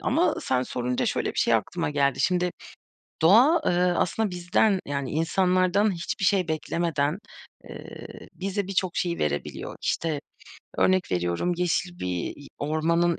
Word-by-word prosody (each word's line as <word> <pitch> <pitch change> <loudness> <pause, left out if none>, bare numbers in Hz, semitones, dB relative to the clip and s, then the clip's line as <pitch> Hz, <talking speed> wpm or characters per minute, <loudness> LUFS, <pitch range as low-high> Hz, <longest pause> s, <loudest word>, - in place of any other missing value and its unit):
ama - - +2
sen 125 -1 0
sorunca 125 0 -2
şöyle - - 0
bir - - -6
şey - - +3
aklıma - - -1
geldi. 140 -2 +1
Şimdi 180 -1 +2 0.7
doğa, 245 - +6
ııı, 180 0 +2
aslında 215 +4 0
bizden, 180 +3 +2
yani, 140 -2 -3
insanlardan 185 +5 +2
hiçbir 175 +2 -3
şey 185 -2 +2
beklemeden, 160 +1 -1 0.5
eee, - - -10
bize 195 +1 -3
birçok 185 -2 -1
şeyi 170 -1 -1
verebiliyor. 75 -1 -3
İşte, 155 -3 -1 0.6
örnek 185 - +2
veriyorum 90 - 0
yeşil 175 0 -1
bir 90 -1 -3
i 145 - -13
ormanın 165 +3 +1
175 Hz, 135 wpm, -26 LUFS, 145-185 Hz, 0.7 s, doğa